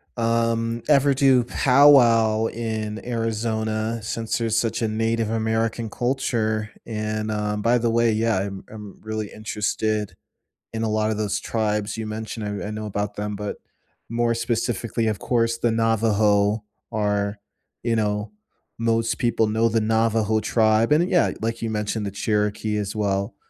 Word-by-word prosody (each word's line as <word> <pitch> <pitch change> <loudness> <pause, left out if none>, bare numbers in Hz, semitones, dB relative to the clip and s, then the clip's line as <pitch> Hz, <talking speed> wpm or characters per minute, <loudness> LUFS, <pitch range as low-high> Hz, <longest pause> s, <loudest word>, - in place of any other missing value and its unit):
um, 115 0 0
ever 140 -1 +4
do 130 -2 +4
powwow 120 -5 +5
in 110 -2 -4
Arizona, 115 -1 -1
since 115 +1 -2
there's 115 -2 0
such 115 0 0
a 110 - +1
Native 115 0 0
American 110 0 -1
culture, 115 -4 -1
and, 110 0 -3
um, 105 0 -2
by 120 +3 +3
the 115 0 0
way, 115 0 +3
yeah, 110 -2 +1
I'm 95 0 -4
I'm 105 -2 -10
really 110 -1 -4
interested 110 0 -2 0.6
in 115 0 -2
a - - 0
lot 110 0 +1
of 110 - -1
those 105 -2 -1
tribes 105 -1 -1
you 110 -1 -4
mentioned, 110 -1 -5
I 105 - -4
I - - -5
know 110 0 -5
about 105 0 -3
them, 105 0 -3
but 105 0 -4 0.5
more 115 0 +1
specifically, 115 -1 -1
of 105 -2 -1
course, 115 -1 0
the 115 -1 +1
Navajo 110 -2 +2 0.3
are, 105 -1 0 0.4
you 115 -1 +1
know 105 - -1 0.5
most 115 0 +1
people 120 -2 +2
know 110 +2 +2
the 115 0 +1
Navajo 110 0 +2
tribe, 110 +1 +2
and, 160 +4 +4
uh, - - -2
yeah, 175 -2 +3
like 115 +1 -2
you 115 - -1
mentioned, 105 0 -2
the - - -2
Cherokee 105 0 -1
as 105 0 -3
well, 100 0 -1
110 Hz, 160 wpm, -23 LUFS, 105-115 Hz, 0.6 s, powwow